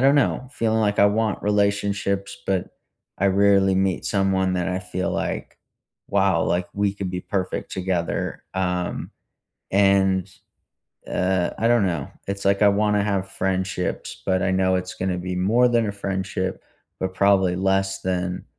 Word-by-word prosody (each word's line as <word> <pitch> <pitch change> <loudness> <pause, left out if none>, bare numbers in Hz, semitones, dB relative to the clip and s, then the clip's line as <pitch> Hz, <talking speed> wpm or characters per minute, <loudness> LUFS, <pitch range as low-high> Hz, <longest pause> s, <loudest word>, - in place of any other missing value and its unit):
don't 135 +2 +5
know, 130 -2 +1
feeling 110 -4 0
like 105 -1 +1
I 100 - +7
want 110 0 0
relationships, 100 -1 0
but 95 -2 -2 0.4
I 100 - +2
rarely 100 0 +4
meet 95 -1 0
someone 95 -2 +1
that 90 0 -1
I 90 0 -1
feel 90 0 -3
like, - - -3 0.5
"Wow," 95 -4 +2
like, 90 0 0
"We 100 -1 0
could 100 -2 -4
be 90 0 -3
perfect 95 -2 -3
together," 90 -3 -2
um, 90 -1 -2 0.6
and, 95 -2 +3 0.8
uh 90 -1 0
I 115 - +2
don't 120 -4 +4
know, 85 -7 -3 0.2
it's 100 0 -4
like 100 +1 +3
I 105 - +7
wanna 105 0 +2
have 95 -2 -1
friendships, 95 -1 -3
but 95 0 +1
I 95 - +1
know 95 0 +2
it's 90 0 -4
gonna 95 -1 -2
be 90 +1 -4
more 115 +7 +3
than 115 -2 +2
a 100 - -2
friendship, 95 -1 -3 0.3
but 95 0 -2
probably 95 -2 +3
less 95 0 0
than, 90 -1 -2
95 Hz, 160 wpm, -23 LUFS, 95-100 Hz, 0.8 s, I